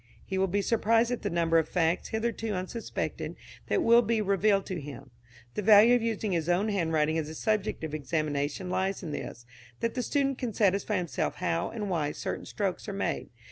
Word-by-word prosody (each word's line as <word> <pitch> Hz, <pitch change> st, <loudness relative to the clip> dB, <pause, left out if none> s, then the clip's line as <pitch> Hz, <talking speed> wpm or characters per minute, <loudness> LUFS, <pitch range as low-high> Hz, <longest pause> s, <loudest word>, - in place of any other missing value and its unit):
He 190 Hz, -1 st, -2 dB
will 190 Hz, -, +3 dB
be 200 Hz, +2 st, 0 dB
surprised 230 Hz, +2 st, +2 dB
at 245 Hz, -, -2 dB
the -, -, -1 dB
number 165 Hz, -1 st, +3 dB
of 160 Hz, -, -2 dB
facts 170 Hz, -1 st, +1 dB
hitherto 225 Hz, -1 st, -2 dB
unsuspected 185 Hz, +6 st, -4 dB, 0.3 s
that 365 Hz, -, +1 dB
will 235 Hz, +1 st, +6 dB
be 230 Hz, 0 st, 0 dB
revealed 200 Hz, 0 st, +2 dB
to 180 Hz, -4 st, -4 dB
him. 140 Hz, -2 st, -9 dB, 0.4 s
The -, -, -2 dB
value 215 Hz, +3 st, +7 dB
of 245 Hz, -, +4 dB
using 220 Hz, -2 st, -1 dB
his 170 Hz, -1 st, -1 dB
own 190 Hz, +5 st, +2 dB
handwriting 160 Hz, -5 st, +1 dB
as 155 Hz, -1 st, -4 dB
a 160 Hz, -, -7 dB
subject 215 Hz, -2 st, -1 dB
of 155 Hz, -2 st, -4 dB
examination 155 Hz, +3 st, -2 dB
lies 190 Hz, +1 st, -1 dB
in 160 Hz, -, -5 dB
this, 120 Hz, -4 st, -6 dB, 0.3 s
that 230 Hz, -, -1 dB
the 250 Hz, -, -1 dB
student 275 Hz, 0 st, 0 dB
can 240 Hz, -5 st, -3 dB
satisfy 200 Hz, 0 st, +2 dB
himself 175 Hz, -3 st, -2 dB
how 165 Hz, +1 st, -1 dB
and 215 Hz, -3 st, -4 dB
why 155 Hz, -6 st, -1 dB
certain -, -, -5 dB
strokes -, -, -3 dB
are -, -, -4 dB
made. -, -, -2 dB
190 Hz, 200 wpm, -29 LUFS, 165-220 Hz, 0.4 s, value